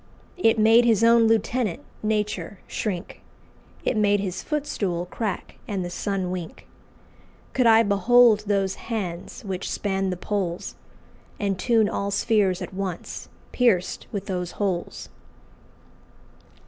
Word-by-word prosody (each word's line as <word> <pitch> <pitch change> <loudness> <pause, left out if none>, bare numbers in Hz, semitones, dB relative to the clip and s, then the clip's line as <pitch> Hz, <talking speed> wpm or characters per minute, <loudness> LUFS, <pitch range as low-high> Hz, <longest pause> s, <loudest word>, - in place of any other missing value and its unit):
It 225 -11 +3
made 225 +2 +6
his 230 -2 +3
own 230 0 +6
lieutenant, 225 -2 +1 0.2
Nature, 210 -1 -2
shrink; 185 -5 -4 0.6
It - - +1
made 205 -1 +3
his 190 -2 -3
footstool 200 - -2
crack 200 +2 -4
and 195 -3 -2
the 175 - -5
sun 190 -1 -2
wink. 180 -3 -6 0.9
Could 255 -2 +3
I 225 0 +7
behold 215 +2 +5
those 195 -2 +1 0.2
hands, 185 -7 -4
which 190 -1 -4
span 195 -1 -1
the 180 - -3
Poles, 180 -3 -3 0.7
And 195 -2 -1
tune 225 0 +3
all 200 0 -2
sphears 200 -2 +1
at - - -8
once, 190 -3 -5 0.2
pierced 225 -8 +1
with 200 -2 -4
those 180 -3 -3
holes!" 190 -4 -3
200 Hz, 125 wpm, -24 LUFS, 185-225 Hz, 0.9 s, I